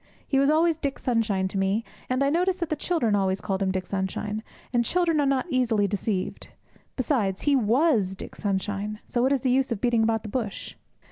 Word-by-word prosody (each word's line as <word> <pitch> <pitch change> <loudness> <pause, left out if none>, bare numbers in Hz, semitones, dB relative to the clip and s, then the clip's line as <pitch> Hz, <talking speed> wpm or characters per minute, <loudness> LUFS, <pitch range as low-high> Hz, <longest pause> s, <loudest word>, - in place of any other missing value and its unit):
He 270 - +2
was 275 +1 +4
always 320 +1 +3
Dick 280 -4 -3
Sunshine 220 -6 0
to 195 - -2
me, 195 +4 +1 0.3
and 255 +2 +1
I 280 - +2
noticed 360 +3 +1
that 340 -3 -2
the 310 - 0
children 295 -9 0
always 190 -1 +1
called 195 -2 -2
him 195 - +1
Dick 185 0 -2
Sunshine, 200 +3 -3 0.3
and 240 -1 +3
children 335 +4 +1
are 285 - +2
not 270 -1 +1
easily 230 -5 +2
deceived. 195 -1 -2 0.5
Besides, 230 -8 0
he 290 -1 +3
was 235 - +2
Dick - - -9
Sunshine, 205 +1 -2
so 240 - -1
what 260 +2 +3
is 275 -3 +2
the 255 - +1
use 265 0 +2
of 225 - -1
beating 235 0 +2
about 225 0 +1
the 215 - -6
bush? 215 -3 -4
230 Hz, 210 wpm, -26 LUFS, 200-275 Hz, 0.5 s, was